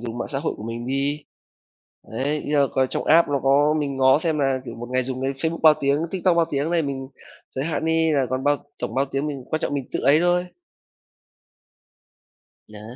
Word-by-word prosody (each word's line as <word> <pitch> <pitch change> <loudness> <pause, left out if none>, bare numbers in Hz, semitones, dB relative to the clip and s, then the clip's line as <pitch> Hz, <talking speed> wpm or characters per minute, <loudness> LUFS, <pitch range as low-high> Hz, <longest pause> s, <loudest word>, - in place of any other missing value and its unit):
dùng 120 0 -6
mạng - - -4
xã 135 - -3
hội 160 - -2
của - - -10
mình 115 +1 -5
đi, 140 +3 -2 0.9
đấy, 145 +6 -2
như 150 0 0
là 140 - +4
coi 130 0 +2
trong - - -2
app 165 +1 +5
nó 140 -2 0
có 145 +3 +3
mình 140 -2 -2
ngó 130 +1 +5
xem 160 -1 -1
là, 135 -2 +1
kiểu, - - -7
một 120 +1 -8
ngày 130 0 +1
dùng 130 0 -4
cái 135 - 0
Facebook 160 +5 -3
bao 155 -1 +8
tiếng, 140 0 +2
TikTok 185 -2 +1
bao 165 -1 +3
tiếng 145 +3 -1
đấy, 170 -1 +2
mình 135 -2 -4 0.5
giới 135 - -2
hạn 160 0 -2
đi 160 0 +2
là 135 -3 +2
còn 130 +2 -3
bao 145 0 +3 0.2
tổng - - -4
bao 135 +1 +2
tiếng, 140 +2 -3
mình 140 -4 -5
quan 155 - -1
trọng 145 - -2
mình 135 -2 -2
tự - - -1
ấy 150 +3 +4
thôi. 175 0 +2 2.2
Đấy. 105 -1 -12
140 Hz, 225 wpm, -23 LUFS, 130-155 Hz, 2.2 s, bao